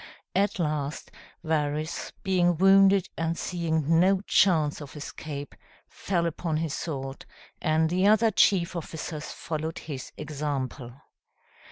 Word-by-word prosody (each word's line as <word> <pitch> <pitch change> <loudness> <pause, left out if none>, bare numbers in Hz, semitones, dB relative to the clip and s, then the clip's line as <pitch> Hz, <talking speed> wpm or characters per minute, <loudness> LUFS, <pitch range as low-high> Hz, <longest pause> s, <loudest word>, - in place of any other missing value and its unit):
At 200 +2 +2
last, 150 -3 -2 0.3
Varus, 155 0 -1
being 175 -3 +2
wounded 195 +1 +5
and 165 0 -1
seeing 165 -2 0
no 190 +2 +4
chance 160 -8 +3
of 145 -1 -10
escape, 145 -1 -7 0.3
fell 175 -3 -1
upon 165 -1 -2
his 160 -2 -2
sword, 135 -5 -5 0.3
and 160 -1 +2
the 185 +4 +2
other 220 +1 +5
chief 185 -3 +3
officers 160 -1 -5
followed 160 0 -4
his 140 -5 -7
example. 140 -4 -4
160 Hz, 120 wpm, -27 LUFS, 150-180 Hz, 0.3 s, wounded